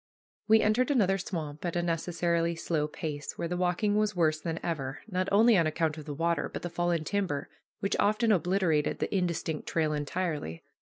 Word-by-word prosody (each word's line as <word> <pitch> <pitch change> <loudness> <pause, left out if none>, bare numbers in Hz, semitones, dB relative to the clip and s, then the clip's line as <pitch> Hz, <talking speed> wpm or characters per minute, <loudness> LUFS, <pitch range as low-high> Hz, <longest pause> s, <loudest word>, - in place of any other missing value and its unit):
We 220 0 +6
entered 230 +5 +2
another 195 -8 +3
swamp, 155 -6 -5
at 175 -1 -2
a 175 - +1
necessarily 170 0 0
slow 160 -2 -1
pace, 150 -1 -5
where 170 - -2
the 180 - -2
walking 180 +4 +1
was 210 -1 +1
worse 155 -3 +2
than 165 0 -3
ever, 145 -5 -3
not 185 -2 -1
only 220 +3 +6
on 165 - +3
account 155 0 0
of 150 - -9
the 150 - -5
water, 165 0 0
but - - -6
the 175 - -4
fallen 175 -2 0
timber, 180 -6 -2 0.3
which 195 - 0
often 215 +3 +3
obliterated 180 -5 +2
the - - -2
indistinct 170 -4 -1
trail 155 -2 +1
entirely. 150 - -3
170 Hz, 185 wpm, -29 LUFS, 155-195 Hz, 0.3 s, We